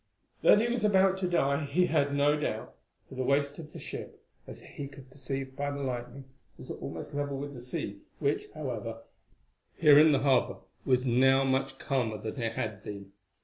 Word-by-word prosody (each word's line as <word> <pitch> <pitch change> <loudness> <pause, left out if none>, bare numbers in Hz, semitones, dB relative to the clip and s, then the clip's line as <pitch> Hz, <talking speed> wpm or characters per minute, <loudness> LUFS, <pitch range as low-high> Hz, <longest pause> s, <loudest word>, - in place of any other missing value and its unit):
That - - +7
he 230 - +2
was 240 -1 -1
about 190 -2 +4
to 185 - 0
die 140 -4 +1
he 165 +6 +2
had 140 -5 +1
no 145 +1 +3
doubt, 150 - -3 0.3
for - - -13
the 130 - -3
waist 140 +2 +1
of 155 -2 -9
the - - -10
ship, - - -6 0.3
as - - -9
he 140 - -8
could 135 -2 -14
perceive 135 0 -5
by 145 +1 -2
the 140 0 -4
lightning, 125 +1 -5 0.3
was - - -9
almost - - -7
level 145 -1 -2
with 145 +1 -5
the 125 - -8
sea, 100 -5 -5 0.2
which, 145 -1 0
however, 115 -6 -5 0.7
here 150 -3 +7
in 155 +1 +7
the 140 - +2
harbour 135 -3 +2 0.3
was 125 0 +2
now 130 +2 +4
much 135 0 0
calmer 125 -6 -1
than 110 +4 -5
it 115 -1 -1
had 110 -2 -4
been. 100 -1 -8
140 Hz, 190 wpm, -30 LUFS, 125-145 Hz, 0.7 s, That